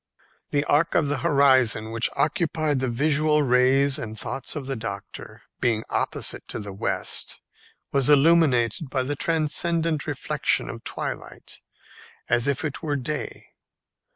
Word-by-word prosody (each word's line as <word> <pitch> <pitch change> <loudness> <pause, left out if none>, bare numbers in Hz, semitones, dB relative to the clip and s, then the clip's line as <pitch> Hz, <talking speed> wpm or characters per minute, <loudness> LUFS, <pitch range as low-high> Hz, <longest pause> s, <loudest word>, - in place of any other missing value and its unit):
The 145 0 +1
arc 160 +3 +2
of 155 -5 +2
the 145 -2 -1
horizon 130 -8 +3
which 115 0 +1
occupied 155 -2 0
the 130 - -1
visual 150 +4 +2
rays 135 +2 +3
and 110 -3 -6
thoughts 135 +4 -4
of 145 -3 -5
the 135 0 -3
doctor, 100 -4 -8 0.2
being 115 -3 +1
opposite - - -1
to - - -6
the 105 -2 -6
west, 95 - -2 0.5
was 140 0 +2
illuminated 145 -4 +3
by 130 -1 -1
the 145 +3 -3
transcendent 160 0 0
reflection - - 0
of - - -10
twilight, - - -6 0.7
as 120 +2 +1
if 140 +2 -1
it 145 - -4
were 150 -3 -2
day. 145 +3 -5
140 Hz, 140 wpm, -24 LUFS, 125-155 Hz, 0.7 s, horizon